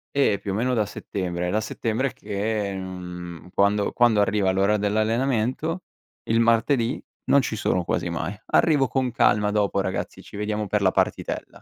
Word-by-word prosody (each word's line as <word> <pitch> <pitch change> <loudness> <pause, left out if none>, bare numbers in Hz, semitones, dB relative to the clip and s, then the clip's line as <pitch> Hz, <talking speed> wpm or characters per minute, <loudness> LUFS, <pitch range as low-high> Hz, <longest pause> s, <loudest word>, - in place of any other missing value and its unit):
Eh, 110 -8 +3
più 100 - -4
o - - -2
meno 125 +3 +1
da 110 -3 +2
settembre. 90 -3 -4
È - - -1
da 110 +1 +1
settembre 115 +5 -2
che, 105 0 -2
mhmm, 90 -2 -7
quando 100 +1 +2
quando 115 -4 +4
arriva 100 -2 +2
l'ora 100 +3 +2
dell'allenamento 115 - 0 0.5
il 115 +1 +3
martedì, 115 +2 +2 0.2
non 140 - +5
ci 115 - -3
sono 90 -4 0
quasi 85 - -1
mai. 85 +4 -3
Arrivo 145 -5 +3
con 130 -2 0
calma 105 -4 +3
dopo, 100 -2 +1
"ragazzi, 95 -1 -4
ci - - -11
vediamo 105 0 -2
per 105 +1 0
la 95 -1 +4
partitella". - - -2
105 Hz, 170 wpm, -24 LUFS, 100-115 Hz, 0.5 s, non